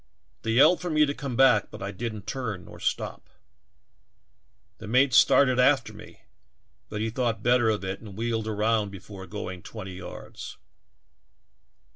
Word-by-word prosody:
They 115 Hz, -, -1 dB
yelled 140 Hz, +9 st, +5 dB
for 180 Hz, -, -3 dB
me 155 Hz, -1 st, +4 dB
to 140 Hz, -, -2 dB
come 140 Hz, -4 st, -5 dB
back 125 Hz, -4 st, +4 dB
but -, -, -9 dB
I 100 Hz, -, -3 dB
didn't 110 Hz, 0 st, -5 dB
turn 105 Hz, -6 st, -4 dB
nor -, -, -12 dB
stop. -, -, -3 dB, 1.5 s
The 110 Hz, -, -9 dB
mate 130 Hz, +4 st, +3 dB
started 130 Hz, 0 st, +5 dB
after 130 Hz, 0 st, +3 dB
me, -, -, -13 dB, 0.7 s
but 105 Hz, 0 st, -4 dB
he 110 Hz, 0 st, -1 dB
thought 115 Hz, -3 st, -1 dB
better 120 Hz, -1 st, +4 dB
of 105 Hz, -2 st, -1 dB
it 95 Hz, +1 st, -4 dB
and 105 Hz, -3 st, -11 dB
wheeled 115 Hz, -1 st, -2 dB
around 110 Hz, 0 st, +1 dB
before 95 Hz, 0 st, -10 dB
going 95 Hz, -4 st, -6 dB
twenty 95 Hz, -2 st, -8 dB
yards. 90 Hz, -, -9 dB
110 Hz, 155 wpm, -26 LUFS, 105-125 Hz, 1.5 s, yelled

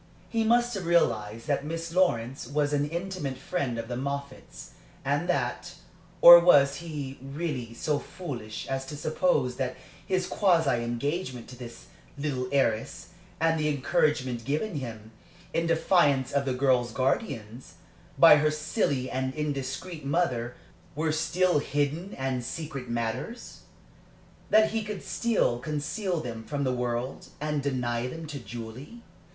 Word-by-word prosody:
He 225 Hz, -1 st, +1 dB
must 240 Hz, +2 st, +3 dB
have 190 Hz, -5 st, -4 dB
realized 115 Hz, -10 st, +1 dB
that 145 Hz, -2 st, 0 dB
Miss 165 Hz, +2 st, -5 dB
Lawrence 135 Hz, -9 st, +1 dB
was 145 Hz, +1 st, 0 dB
an 145 Hz, 0 st, +1 dB
intimate 170 Hz, -5 st, -4 dB
friend 135 Hz, -4 st, -2 dB
of 115 Hz, 0 st, -4 dB
the 120 Hz, -, -4 dB
Moffatts, 140 Hz, +1 st, -6 dB, 0.3 s
and 145 Hz, +6 st, 0 dB
that 120 Hz, -9 st, -1 dB, 0.5 s
Or 175 Hz, 0 st, +12 dB
was 140 Hz, -5 st, +5 dB
he 150 Hz, -5 st, -6 dB
really 135 Hz, -4 st, -4 dB
so 145 Hz, +4 st, 0 dB
foolish 120 Hz, -12 st, -7 dB
as 135 Hz, 0 st, -3 dB
to 145 Hz, -, -6 dB
suppose 155 Hz, -, +1 dB
that 130 Hz, -2 st, -2 dB, 0.3 s
his 185 Hz, -1 st, 0 dB
quasi 165 Hz, -, +2 dB
engagement 125 Hz, +2 st, -3 dB
to 125 Hz, -, -9 dB
this 120 Hz, -1 st, -10 dB, 0.3 s
little 135 Hz, -3 st, -2 dB
heiress, 115 Hz, -6 st, 0 dB, 0.3 s
and 165 Hz, 0 st, +2 dB
the 150 Hz, 0 st, +1 dB
encouragement 135 Hz, -4 st, +1 dB
given 150 Hz, -, -2 dB
him, 110 Hz, -4 st, -7 dB, 0.4 s
in 165 Hz, 0 st, +1 dB
defiance 150 Hz, -5 st, +3 dB
of 140 Hz, 0 st, +1 dB
the 130 Hz, -, 0 dB
girl's 125 Hz, -2 st, +2 dB
guardians, 130 Hz, -, -2 dB, 0.4 s
by -, -, +9 dB
her 155 Hz, +1 st, +3 dB
silly 150 Hz, -, -1 dB
and 130 Hz, 0 st, -2 dB
indiscreet 150 Hz, +3 st, -4 dB
mother, 130 Hz, -6 st, 0 dB, 0.4 s
were 155 Hz, +1 st, 0 dB
still 175 Hz, +2 st, +2 dB
hidden 145 Hz, +6 st, -2 dB
and 130 Hz, -2 st, -2 dB
secret 135 Hz, -1 st, -5 dB
matters? 120 Hz, -, -4 dB, 0.9 s
that 215 Hz, 0 st, +5 dB
he 220 Hz, 0 st, -1 dB
could 210 Hz, -1 st, -6 dB
still 225 Hz, -, +1 dB
conceal 155 Hz, -, -2 dB
them 115 Hz, -5 st, -6 dB
from 145 Hz, +3 st, -3 dB
the 130 Hz, -2 st, +1 dB
world, 125 Hz, +1 st, -3 dB
and 150 Hz, -1 st, -1 dB
deny 125 Hz, -3 st, -1 dB
them 165 Hz, +5 st, -7 dB
to 150 Hz, -2 st, -6 dB
Julie? 120 Hz, -, -9 dB
140 Hz, 145 wpm, -28 LUFS, 125-165 Hz, 0.9 s, Or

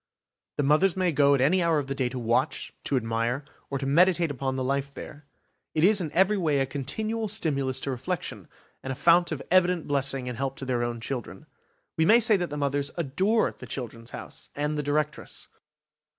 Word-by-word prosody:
The 145 Hz, -, +1 dB
mothers 155 Hz, +7 st, +3 dB
may 185 Hz, -2 st, +2 dB
go 140 Hz, -1 st, +4 dB
at 135 Hz, -, 0 dB
any 175 Hz, +8 st, +3 dB
hour 165 Hz, -2 st, +2 dB
of 145 Hz, -, -1 dB
the 135 Hz, -, -3 dB
day 130 Hz, -2 st, -1 dB
to 130 Hz, -, -6 dB
watch, 120 Hz, +4 st, -1 dB
to 140 Hz, -, +1 dB
admire, 115 Hz, +3 st, -1 dB, 0.2 s
or 140 Hz, -, -2 dB
to 135 Hz, -, -4 dB
meditate 170 Hz, +3 st, +3 dB
upon 135 Hz, -1 st, -3 dB
the 130 Hz, -, -2 dB
life 140 Hz, +1 st, -1 dB
there. 145 Hz, +1 st, -10 dB, 0.5 s
It 155 Hz, -, +2 dB
is 200 Hz, +1 st, +5 dB
in 160 Hz, -4 st, -3 dB
every 190 Hz, +4 st, +3 dB
way 150 Hz, -5 st, +1 dB
a 135 Hz, -, +2 dB
continual 215 Hz, -, -2 dB
stimulus 140 Hz, -10 st, 0 dB
to 140 Hz, -, -2 dB
reflection, 150 Hz, +8 st, -4 dB, 0.3 s
and 130 Hz, -, -5 dB
a -, -, -3 dB
fount 170 Hz, +5 st, +4 dB
of 150 Hz, -3 st, -4 dB
evident 180 Hz, -2 st, +3 dB
blessing 135 Hz, -2 st, +1 dB
and 125 Hz, -1 st, -5 dB
help 135 Hz, 0 st, -2 dB
to 135 Hz, -, -5 dB
their 125 Hz, -2 st, 0 dB
own 120 Hz, -1 st, -3 dB
children. 115 Hz, -6 st, -5 dB, 0.5 s
We 160 Hz, -, +3 dB
may 230 Hz, +2 st, +7 dB
say 225 Hz, -2 st, +5 dB
that 175 Hz, -2 st, -2 dB
the 150 Hz, -, -5 dB
mothers 140 Hz, 0 st, 0 dB
adore 185 Hz, +9 st, +1 dB
the -, -, -12 dB
"Children's 115 Hz, -2 st, -6 dB
House", -, -, -8 dB
and 150 Hz, +1 st, -1 dB
the 150 Hz, -, -1 dB
directress. 150 Hz, +1 st, -2 dB
145 Hz, 210 wpm, -27 LUFS, 130-170 Hz, 0.5 s, may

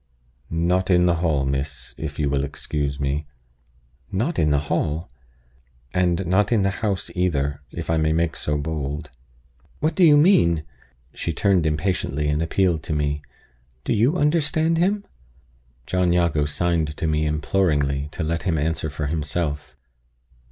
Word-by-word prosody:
"Not 90 Hz, +3 st, +1 dB
in 90 Hz, -1 st, +5 dB
the 85 Hz, -1 st, +3 dB
hall, 80 Hz, -5 st, +1 dB
miss, 70 Hz, +2 st, -3 dB
if 75 Hz, -2 st, -6 dB
you 75 Hz, -, 0 dB
will 70 Hz, -1 st, 0 dB
excuse 70 Hz, 0 st, -3 dB
me." 70 Hz, +2 st, -1 dB, 0.8 s
"Not 125 Hz, -, -1 dB
in 75 Hz, -, +3 dB
the 70 Hz, -1 st, +2 dB
hall!" 75 Hz, -3 st, -1 dB, 0.8 s
"And 90 Hz, 0 st, +1 dB
not 95 Hz, +5 st, +2 dB
in 110 Hz, -4 st, +3 dB
the 100 Hz, -, +2 dB
house 100 Hz, -4 st, -1 dB
either, 70 Hz, -6 st, 0 dB
if 85 Hz, +3 st, -6 dB
I 80 Hz, -, +1 dB
may 80 Hz, 0 st, +2 dB
make 85 Hz, +1 st, +1 dB
so 75 Hz, 0 st, -1 dB
bold." 75 Hz, 0 st, -4 dB, 0.7 s
"What 155 Hz, +2 st, +1 dB
do 185 Hz, -, +2 dB
you 150 Hz, -3 st, +7 dB
mean?" 85 Hz, -, +4 dB, 0.5 s
She 85 Hz, -, -3 dB
turned 90 Hz, -1 st, +2 dB
impatiently, 75 Hz, -2 st, -1 dB
and 75 Hz, +1 st, +1 dB
appealed 85 Hz, -1 st, +1 dB
to -, -, -2 dB
me. 75 Hz, -1 st, -1 dB, 0.6 s
"Do -, -, 0 dB
you 120 Hz, +10 st, +2 dB
understand 160 Hz, +1 st, +2 dB
him?" 200 Hz, +3 st, +1 dB, 0.8 s
John 90 Hz, +1 st, +1 dB
Jago 85 Hz, -4 st, +2 dB
signed 80 Hz, -1 st, 0 dB
to -, -, -2 dB
me 75 Hz, -1 st, +1 dB
imploringly 75 Hz, -3 st, 0 dB
to 90 Hz, -, -3 dB
let 80 Hz, +1 st, -1 dB
him 90 Hz, -5 st, 0 dB
answer 80 Hz, +1 st, -1 dB
for 75 Hz, +1 st, -4 dB
himself. 75 Hz, 0 st, -3 dB
80 Hz, 155 wpm, -23 LUFS, 75-95 Hz, 0.8 s, you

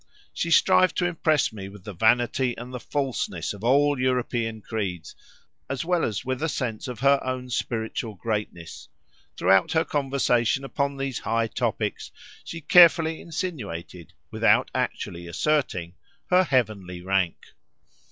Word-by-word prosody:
She 170 Hz, -, -2 dB
strived 185 Hz, +2 st, +4 dB
to 175 Hz, -, +1 dB
impress 155 Hz, -7 st, +1 dB
me 95 Hz, -2 st, -7 dB
with 100 Hz, -1 st, -13 dB
the 105 Hz, -, -7 dB
vanity 120 Hz, +5 st, +2 dB
and 125 Hz, +2 st, -8 dB
the 125 Hz, -, -4 dB
falseness 130 Hz, -, -3 dB
of 100 Hz, +1 st, -11 dB
all 140 Hz, +3 st, +3 dB
European 120 Hz, -3 st, -1 dB
creeds, 95 Hz, -7 st, -4 dB, 0.5 s
as 140 Hz, +4 st, -3 dB
well 175 Hz, -1 st, +1 dB
as 110 Hz, +2 st, -2 dB
with 130 Hz, 0 st, -2 dB
a 160 Hz, -, 0 dB
sense 125 Hz, -3 st, -3 dB
of 125 Hz, -2 st, -7 dB
her 140 Hz, 0 st, +4 dB
own 130 Hz, -1 st, -4 dB
spiritual 110 Hz, -2 st, -3 dB
greatness: 105 Hz, -5 st, -5 dB, 0.5 s
throughout 95 Hz, +1 st, +3 dB
her 160 Hz, 0 st, +2 dB
conversation 135 Hz, -3 st, +1 dB
upon 140 Hz, 0 st, -2 dB
these 135 Hz, -3 st, -3 dB
high 115 Hz, +1 st, 0 dB
topics 110 Hz, -, -2 dB, 0.3 s
she 165 Hz, -, -7 dB
carefully 165 Hz, 0 st, +6 dB
insinuated, 100 Hz, -, -6 dB, 0.2 s
without -, -, +3 dB
actually 85 Hz, 0 st, -3 dB
asserting, 90 Hz, -, -1 dB, 0.4 s
her 185 Hz, +1 st, +5 dB
heavenly 105 Hz, -, -1 dB
rank. 95 Hz, -3 st, -1 dB
125 Hz, 140 wpm, -25 LUFS, 105-145 Hz, 0.5 s, carefully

